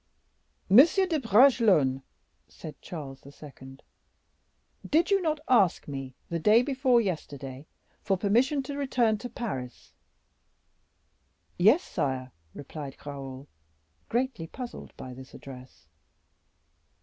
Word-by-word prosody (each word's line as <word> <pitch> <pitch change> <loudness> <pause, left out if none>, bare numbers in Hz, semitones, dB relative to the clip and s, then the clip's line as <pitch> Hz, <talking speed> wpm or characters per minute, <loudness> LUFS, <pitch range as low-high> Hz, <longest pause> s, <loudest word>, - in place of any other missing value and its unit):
"Monsieur 310 - +6
de 330 -4 -1
Bragelonne," 210 - +4 0.5
said 155 -3 -11
Charles 140 -6 -8
II., 135 -2 -13 1.1
"did 335 +6 +2
you 395 -1 +3
not 310 -3 -1
ask 200 -8 +3
me 135 -2 -6
the 170 - -3
day 215 +8 +5
before 260 -2 +2
yesterday 145 - -5 0.3
for 195 -2 0
permission 245 +9 +1
to 280 +2 -6
return 245 -6 +1
to 245 - -7
Paris?" 135 - -6 1.7
"Yes, 220 - +5
sire," 130 -2 -3 0.2
replied 145 -1 -8
Raoul, 135 -1 -8 0.6
greatly 240 -8 -2
puzzled 250 +6 -8
by 130 - -8
this 130 +1 -12
address. 130 -7 -12
190 Hz, 105 wpm, -28 LUFS, -, 1.7 s, Monsieur